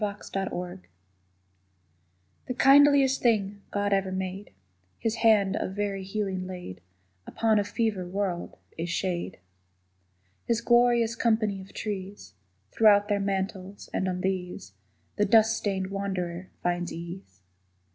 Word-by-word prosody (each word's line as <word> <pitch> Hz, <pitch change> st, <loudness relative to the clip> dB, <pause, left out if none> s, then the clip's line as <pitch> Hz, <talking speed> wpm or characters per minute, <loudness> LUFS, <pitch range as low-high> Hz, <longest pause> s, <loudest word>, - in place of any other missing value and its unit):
SHADE 195 Hz, -3 st, -4 dB, 1.7 s
The 250 Hz, -, -3 dB
kindliest 275 Hz, -1 st, +6 dB
thing 205 Hz, -4 st, +1 dB
God 205 Hz, 0 st, 0 dB
ever 195 Hz, -1 st, +1 dB
made, 190 Hz, +1 st, -4 dB, 0.5 s
His 225 Hz, 0 st, -2 dB
hand 210 Hz, -4 st, +4 dB
of 190 Hz, -, -3 dB
very 200 Hz, -2 st, -2 dB
healing 190 Hz, -2 st, -3 dB
laid 180 Hz, -, -8 dB, 0.5 s
Upon 220 Hz, -2 st, +2 dB
a -, -, +1 dB
fevered 205 Hz, -4 st, -2 dB
world, 190 Hz, -3 st, -3 dB, 0.2 s
is 170 Hz, +1 st, -2 dB
shade. 175 Hz, 0 st, -2 dB, 1.1 s
His 235 Hz, -1 st, +1 dB
glorious 240 Hz, -1 st, +3 dB
company 220 Hz, -5 st, +1 dB
of 190 Hz, -, -13 dB
trees 195 Hz, -, -6 dB, 0.4 s
Throw 215 Hz, -2 st, +6 dB
out 205 Hz, +1 st, -1 dB
their 205 Hz, -1 st, +2 dB
mantles, 195 Hz, 0 st, -3 dB
and 190 Hz, -, 0 dB
on 180 Hz, 0 st, -3 dB
these 180 Hz, -, -3 dB, 0.4 s
The 210 Hz, -, +3 dB
dust 220 Hz, +2 st, +5 dB
stained 195 Hz, -3 st, -2 dB
wanderer 185 Hz, -3 st, -3 dB
finds 175 Hz, 0 st, -1 dB
ease. 170 Hz, -, -9 dB
195 Hz, 125 wpm, -27 LUFS, 185-215 Hz, 1.7 s, kindliest